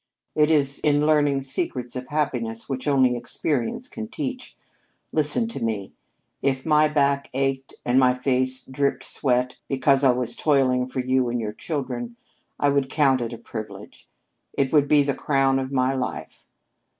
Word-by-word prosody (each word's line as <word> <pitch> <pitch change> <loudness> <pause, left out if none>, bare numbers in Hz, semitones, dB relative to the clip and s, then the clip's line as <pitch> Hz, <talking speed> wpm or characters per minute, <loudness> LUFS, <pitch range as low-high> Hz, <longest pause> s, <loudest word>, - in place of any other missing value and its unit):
It 150 0 +3
is 140 -3 +2
in 145 0 +2
learning 145 -3 +3
secrets 130 -2 -2
of 125 0 -5
happiness 125 -7 -2
which 135 0 -4
only 130 -3 +3
experience 120 - -2
can 225 -5 -7
teach. 260 0 -5 0.6
Listen 155 +9 +2
to 140 - -5
me: 105 -4 -3 0.5
If 130 -1 0
my 155 -1 +4
back 140 -2 +1
ached 135 0 -2
and 125 +2 +3
my 125 -1 +4
face 130 0 0
dripped 130 -1 -1
sweat 125 -1 0
because 135 0 +2
I 135 - +6
was 125 -1 +1
toiling 130 -4 +2
for 130 0 -3
you 130 -1 +1
and 120 0 -1
your 105 -2 -4
children, 125 -6 -4 0.4
I 145 - +3
would 140 -1 +1
count 135 -3 +2
it 115 0 -3
a 120 - -6
privilege. 110 -1 -9 0.5
It 135 +1 0
would 145 -2 +4
be 145 -1 +5
the 140 0 0
crown 135 -2 +1
of 130 0 -4
my 130 0 +1
life. 130 -2 -5
135 Hz, 165 wpm, -24 LUFS, 125-145 Hz, 0.6 s, I